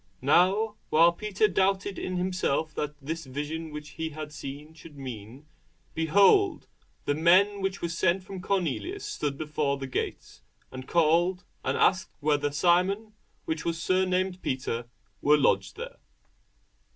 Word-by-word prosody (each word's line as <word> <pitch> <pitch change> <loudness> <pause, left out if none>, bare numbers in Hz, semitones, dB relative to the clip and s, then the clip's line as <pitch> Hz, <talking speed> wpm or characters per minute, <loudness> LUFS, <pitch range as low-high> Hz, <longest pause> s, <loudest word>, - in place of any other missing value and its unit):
Now 195 +9 +3
while 165 +2 +6
Peter 210 +3 0
doubted 195 0 0
in 185 0 -3
himself 180 -4 -1
what 150 0 -3
this 160 +1 -5
vision 150 +4 -4
which 150 0 -8
he 160 0 -4
had 155 0 -7
seen 150 +1 -8
should 160 -2 -14
mean, 125 +1 -8 0.5
behold, 200 - +4 0.4
the 145 - +1
men 185 +6 +4
which 195 -1 -2
were - - +1
sent 170 +2 +1
from 190 -1 -8
Cornelius 195 - -2
stood 145 -2 -3
before 150 -2 -1
the 135 - -5
gate, 130 - -5 0.3
and 130 0 -8
called, 170 +2 +2 0.2
and - - 0
asked 185 0 +2
whether 145 -1 +1
Simon, 185 +7 +2 0.3
which 160 0 -3
was 165 -1 -2
surnamed 185 +1 0
Peter, 125 -3 -3 0.3
were 150 +1 +5
lodged 145 - +1
there. - - -7
165 Hz, 140 wpm, -27 LUFS, 150-185 Hz, 0.5 s, while